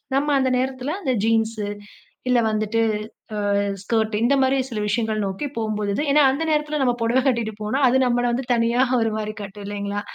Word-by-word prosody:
நம்ம 285 +2 +1
அந்த 265 -1 +2
நேரத்துல 260 +3 -2
அந்த 265 -8 0
ஜீன்ஸ், 225 0 +1 0.7
இல்ல 250 -1 +4
வந்துட்டு 215 +1 0 0.8
அ 200 - +2 0.2
ஸ்கர்ட் 220 0 0
இந்த 275 +4 +4
மாரி 265 +1 +2
சில 215 -2 -2
விஷயங்கள் 215 -1 0
நோக்கி 195 +10 -3
போம்பொழுது, 210 0 -1
ஏன்னா 295 0 +5
அந்த 315 +4 -2
நேரத்துல 300 -1 0
நம்ம 245 -2 +2
பொடவ 240 +3 +2
கட்டிட்டு 230 -4 -1
போனா 260 +7 -1
அது 260 +2 +3
நம்மள 245 0 +1
வந்து 255 +2 -2
தனியா 235 +2 +2 0.2
ஒரு 225 -1 +1
மாரி 215 0 -4
காட்டும் 200 0 -8
இல்லைங்களா? 205 0 -3
230 Hz, 175 wpm, -22 LUFS, 215-260 Hz, 0.8 s, ஏன்னா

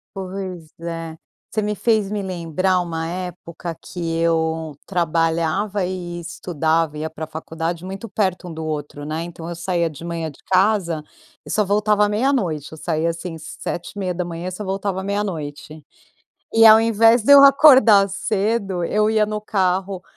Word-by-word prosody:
Pois 185 -3 -6
é. 165 -1 -5 0.3
Você 215 - -1
me 210 0 -1
fez 215 -2 +1
me 210 -1 -2
lembrar 185 0 0
uma 165 -2 -4
época 175 -1 -6
que 180 - -9 0.2
eu 160 -2 0
trabalhava 170 +4 0
e 175 -1 -5
estudava, 160 -2 -1
ia 155 +1 -3
pra 160 0 -6
faculdade, 160 +2 -5
muito 195 +4 -7
perto 190 -3 -1
um - - -7
do 160 0 -6
outro, 145 -1 -5
né, 155 +2 -3
então 170 -1 -8
eu 170 - -5
saía 170 -1 -1
de 155 +1 -11
manhã 170 -2 -3
de 145 - -16
casa 185 -5 +2 0.4
e - - -11
só 215 - +2
voltava 210 +1 +2
meia-noite. 210 - 0
Eu 160 - -9
saía, 160 +1 -1
assim, 165 0 -7
7h30 175 +1 -5
e - - -8
só 185 +4 -6
voltava 195 0 -2
meia-noite. 155 -7 -4 0.7
E 225 0 +6
ao 220 0 +9
invés 225 +1 +4
de 285 - +4
eu 280 0 +10
acordar 260 -8 +7
cedo, 200 -2 -1
eu 210 +5 +1
ia 215 -1 +3
no 210 0 -3
carro 190 -2 -1
180 Hz, 160 wpm, -21 LUFS, 165-205 Hz, 0.7 s, eu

